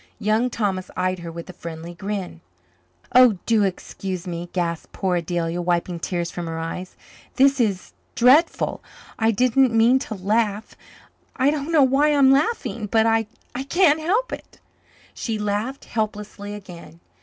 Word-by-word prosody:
Young 220 Hz, +4 st, +1 dB
Thomas 195 Hz, -6 st, -2 dB
eyed 185 Hz, 0 st, 0 dB
her 170 Hz, -1 st, -7 dB
with 170 Hz, 0 st, -8 dB
a 185 Hz, -, -9 dB
friendly 165 Hz, 0 st, -8 dB
grin. 195 Hz, -, -5 dB, 0.7 s
"Oh, 250 Hz, -5 st, +7 dB
do 225 Hz, -2 st, +3 dB
excuse 185 Hz, -1 st, -4 dB
me," 175 Hz, -1 st, -5 dB
gasped 170 Hz, -3 st, -3 dB
poor 185 Hz, -2 st, 0 dB
Adelia, 170 Hz, 0 st, -2 dB
wiping 175 Hz, 0 st, -1 dB
tears 175 Hz, 0 st, -3 dB
from 175 Hz, -1 st, -5 dB
her 165 Hz, 0 st, -4 dB
eyes. 165 Hz, +3 st, -5 dB, 0.4 s
"This 275 Hz, 0 st, +4 dB
is 200 Hz, -6 st, -1 dB, 0.2 s
dreadful 270 Hz, +8 st, +3 dB, 0.4 s
I 225 Hz, 0 st, +3 dB
didn't 250 Hz, +3 st, +3 dB
mean 230 Hz, +3 st, +5 dB
to 230 Hz, -5 st, -5 dB
laugh 210 Hz, +2 st, -1 dB, 0.6 s
I 270 Hz, +2 st, +3 dB
don't 300 Hz, +1 st, -3 dB
know 310 Hz, -4 st, +5 dB
why 285 Hz, +3 st, +3 dB
I'm 270 Hz, -2 st, +6 dB
laughing 270 Hz, -, 0 dB
but 220 Hz, +2 st, +3 dB
I 225 Hz, -1 st, +2 dB, 0.4 s
can't 335 Hz, -3 st, +4 dB
help 405 Hz, +11 st, 0 dB
it." -, -, -10 dB, 0.5 s
She 225 Hz, -2 st, -3 dB
laughed 210 Hz, +6 st, -3 dB
helplessly 210 Hz, -2 st, -4 dB
again. 175 Hz, -5 st, -12 dB
210 Hz, 150 wpm, -23 LUFS, 180-255 Hz, 0.7 s, Oh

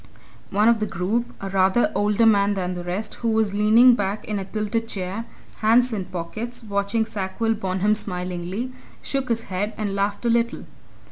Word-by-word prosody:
One 205 Hz, +2 st, +3 dB
of 235 Hz, -1 st, +4 dB
the 215 Hz, -, -1 dB
group, 205 Hz, +8 st, -1 dB
a 195 Hz, -, -4 dB
rather 190 Hz, +4 st, +3 dB
older 210 Hz, +2 st, +2 dB
man 205 Hz, -2 st, +4 dB
than 180 Hz, -1 st, -2 dB
the 175 Hz, -1 st, -5 dB
rest, 180 Hz, +5 st, -3 dB
who 230 Hz, -, +1 dB
was 220 Hz, -2 st, +1 dB
leaning 220 Hz, +4 st, +6 dB
back 205 Hz, -2 st, -2 dB
in 210 Hz, -1 st, -2 dB
a 195 Hz, -, -5 dB
tilted 215 Hz, +3 st, -2 dB
chair, 195 Hz, +2 st, -4 dB, 0.3 s
hands 235 Hz, +3 st, +3 dB
in 195 Hz, -4 st, -2 dB
pockets, 200 Hz, +7 st, -5 dB
watching 200 Hz, +2 st, 0 dB
Sackville 220 Hz, +1 st, -1 dB
Bonham 190 Hz, 0 st, 0 dB
smilingly, 180 Hz, +4 st, -3 dB, 0.3 s
shook 270 Hz, -2 st, -2 dB
his 230 Hz, -1 st, 0 dB
head 200 Hz, +2 st, -3 dB
and 205 Hz, -2 st, -2 dB
laughed 200 Hz, +3 st, -1 dB
a -, -, +3 dB
little. 235 Hz, 0 st, +1 dB
210 Hz, 180 wpm, -23 LUFS, 190-225 Hz, 0.3 s, leaning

